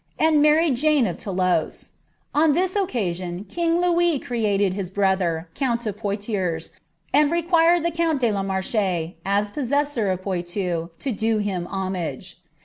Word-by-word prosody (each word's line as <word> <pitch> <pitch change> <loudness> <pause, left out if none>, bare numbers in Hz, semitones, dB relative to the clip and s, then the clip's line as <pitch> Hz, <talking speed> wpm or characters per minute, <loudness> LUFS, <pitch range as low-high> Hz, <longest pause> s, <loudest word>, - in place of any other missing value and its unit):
and 315 -2 +4
married 305 -2 +4
Janeof 280 - +2
Thoulouse; 185 -4 -1 0.4
en 300 0 +4
this 370 +4 0
occasion 185 - -2
king 335 +7 0
Louis 345 -2 +2
created 205 -6 0
his 190 -2 -4
brother, 190 -4 0
count 235 -1 -1
of 210 -3 -2
Poictiers, 200 -5 -3 0.4
and 295 +1 +4
nqoiml 340 0 +3
llie 340 - 0
count 330 -3 +1
de 240 -3 +2
la 200 -1 -1
Marche, 190 -3 -1
as 205 +1 0
possessor 280 -4 0
of 185 0 -2
Poitou, 175 -2 -2
to 270 - -3
do 220 0 0
him 190 -4 -2
homage. 185 -8 -4
210 Hz, 140 wpm, -23 LUFS, 185-300 Hz, 0.4 s, and